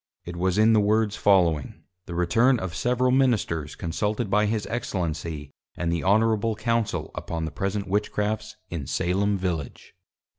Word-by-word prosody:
It 85 Hz, -, -6 dB
was 90 Hz, +2 st, 0 dB
in 110 Hz, +1 st, +5 dB
the 110 Hz, -, +5 dB
Words 105 Hz, 0 st, +2 dB
following: 85 Hz, -8 st, +2 dB, 0.2 s
The 85 Hz, -, -6 dB
Return 115 Hz, +10 st, +3 dB
of 90 Hz, -3 st, -5 dB
several 125 Hz, +6 st, +1 dB
Ministers 110 Hz, -, +1 dB
consulted 105 Hz, +5 st, -2 dB
by 105 Hz, 0 st, +3 dB
his 110 Hz, -1 st, -1 dB
Excellency, 85 Hz, -9 st, -3 dB, 0.3 s
and 85 Hz, -1 st, -1 dB
the 85 Hz, -1 st, -1 dB
Honourable 110 Hz, +2 st, +2 dB
Council, 115 Hz, 0 st, -1 dB
upon 80 Hz, -1 st, -4 dB
the 80 Hz, -, -5 dB
present 100 Hz, +1 st, -2 dB
Witchcrafts 105 Hz, +2 st, -1 dB, 0.2 s
in 75 Hz, -6 st, -4 dB
Salem 100 Hz, +3 st, 0 dB
Village. 85 Hz, -7 st, -4 dB
100 Hz, 150 wpm, -25 LUFS, 85-110 Hz, 0.3 s, in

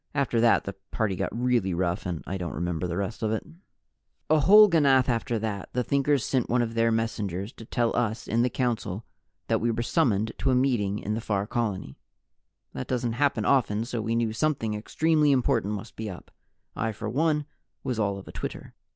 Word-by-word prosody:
After 130 Hz, -5 st, +1 dB
that, 115 Hz, 0 st, +4 dB
the 100 Hz, -, -5 dB, 0.2 s
party 105 Hz, -4 st, -1 dB
got -, -, -2 dB
really 120 Hz, -6 st, +1 dB
rough, 90 Hz, 0 st, -1 dB
and 85 Hz, -3 st, -4 dB
I 95 Hz, -, -4 dB
don't 85 Hz, -6 st, -4 dB
remember 85 Hz, +2 st, -2 dB
the 85 Hz, 0 st, -3 dB
rest 100 Hz, +4 st, -3 dB
of 110 Hz, -1 st, 0 dB
it. 110 Hz, -, -2 dB, 0.9 s
A 155 Hz, -, +6 dB
whole 210 Hz, +8 st, +8 dB
ganath 140 Hz, -8 st, +4 dB
after 115 Hz, -1 st, 0 dB
that, 105 Hz, -3 st, -4 dB
the 125 Hz, -, 0 dB
Thinkers 140 Hz, -1 st, +1 dB
sent 130 Hz, -3 st, 0 dB
one 120 Hz, 0 st, +3 dB
of 115 Hz, -1 st, -4 dB
their 115 Hz, 0 st, +2 dB
messengers 105 Hz, -3 st, -2 dB
to 115 Hz, -, -11 dB
tell 120 Hz, 0 st, 0 dB
us 115 Hz, -2 st, -1 dB
in 115 Hz, +2 st, +1 dB
the 125 Hz, -, +2 dB
Council 115 Hz, -5 st, -2 dB, 0.4 s
that -, -, 0 dB
we 120 Hz, -, +1 dB
were 115 Hz, +1 st, -1 dB
summoned 110 Hz, -, +1 dB
to 135 Hz, -, +1 dB
a 130 Hz, -, +4 dB
meeting 120 Hz, -6 st, +1 dB
in 105 Hz, 0 st, -3 dB
the 110 Hz, -, -2 dB
Far 100 Hz, -2 st, -1 dB
Colony. 105 Hz, -, -3 dB, 0.7 s
That 65 Hz, -, -5 dB
doesn't 120 Hz, -2 st, -1 dB
happen 125 Hz, -4 st, +1 dB
often, 115 Hz, -5 st, +2 dB
so 120 Hz, -2 st, -3 dB
we 115 Hz, +1 st, -1 dB
knew 115 Hz, -2 st, 0 dB
something 115 Hz, -4 st, 0 dB
extremely 150 Hz, +7 st, +2 dB
important 120 Hz, -5 st, +1 dB
must 105 Hz, +3 st, -8 dB
be 110 Hz, -1 st, -5 dB
up. 90 Hz, -, -10 dB, 0.4 s
I 110 Hz, 0 st, -1 dB
for -, -, -6 dB
one 150 Hz, +1 st, +1 dB, 0.4 s
was 125 Hz, -3 st, -2 dB
all 100 Hz, -2 st, 0 dB
of 95 Hz, -, -11 dB
a -, -, -8 dB
twitter. -, -, -6 dB
115 Hz, 205 wpm, -27 LUFS, 105-125 Hz, 0.9 s, whole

